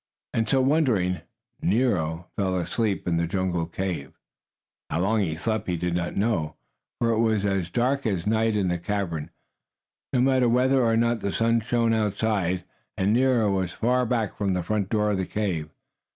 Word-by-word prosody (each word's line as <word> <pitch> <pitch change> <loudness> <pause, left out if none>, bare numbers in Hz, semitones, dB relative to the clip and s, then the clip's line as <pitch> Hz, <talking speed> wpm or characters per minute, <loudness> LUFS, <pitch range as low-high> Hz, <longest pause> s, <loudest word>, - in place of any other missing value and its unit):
And 115 -1 0
so, 135 - +3
wondering, 120 - +2 0.4
Nero 90 -7 +1
fell 95 -2 0
asleep 100 +3 -1
in 85 -1 +1
the 85 0 0
jungle 90 -2 -1
cave. 85 -6 -4 0.7
How 80 - -1
long 105 +3 +2
he 80 -5 -1
slept 110 +6 -2
he 90 -2 0
did 90 +1 -2
not 85 0 -2
know, 90 -8 0 0.4
for 115 - +1
it 110 - +1
was 110 -3 +2
as 95 -3 0
dark 130 +4 0
as 95 -5 -1
night 110 +1 +2
in 95 -3 +1
the 90 0 -1
cavern, 85 -5 -3 0.8
no 130 - +1
matter 130 -1 +3
whether 130 +2 +3
or 115 -1 +3
not 115 0 +2
the 100 - -2
sun 115 +2 +2
shone 115 0 +1
outside, 105 -4 0 0.3
and 100 +3 +2
Nero 120 -4 +3
was 95 -2 -1
far 125 +1 +1
back 115 -4 -1
from 100 -2 0
the 90 - -1
front 100 +1 -1
door 105 -1 +1
of 100 - 0
the 95 - -1
cave. 90 -8 -2
105 Hz, 180 wpm, -25 LUFS, 90-115 Hz, 0.8 s, so